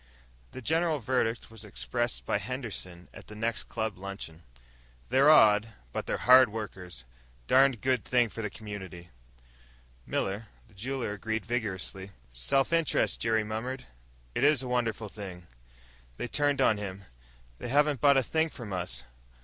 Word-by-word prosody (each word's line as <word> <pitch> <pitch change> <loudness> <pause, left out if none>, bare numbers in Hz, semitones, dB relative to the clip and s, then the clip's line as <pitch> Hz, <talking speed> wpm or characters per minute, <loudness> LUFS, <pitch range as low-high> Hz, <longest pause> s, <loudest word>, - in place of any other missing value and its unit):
The 130 - -9
general 160 +2 +2
verdict 115 -3 -1
was 115 -1 -9
expressed - - -2
by - - +1
Henderson 100 -9 -5
at - - -12
the 105 - -10
next 115 +1 -1
club 110 -4 -3
luncheon. 95 -4 -7 0.7
"They're 135 +4 +5
odd, 110 -6 +6 0.2
but - - -3
they're - - 0
hard 130 -1 +7
workers. 90 - -7 0.4
Darned 130 - +4
good 130 -3 +1
thing 125 -2 +3
for 115 - -6
the 105 - -2
community." 95 -5 -8 1.0
Miller, 100 +4 -2 0.2
the 110 - -23
jeweler, 120 +2 -3
agreed 110 0 -3
vigorously. 100 -4 -3 0.2
"Self 65 - +1
interest," 165 -2 +2
Jerry 110 -1 +2
murmured, 115 +5 -4 0.5
"is 140 0 +3
a - - -5
wonderful 115 -3 -1
thing." 95 -4 -9 0.7
They - - -3
turned 145 0 +1
on 110 -5 +4
him. 100 -1 -6 0.6
"They - - -5
haven't 145 +1 +2
bought 140 -1 +6
a 135 - +4
thing 160 +5 +1
from 115 -9 -8
us! 65 -10 -3
110 Hz, 150 wpm, -29 LUFS, 100-130 Hz, 1.0 s, hard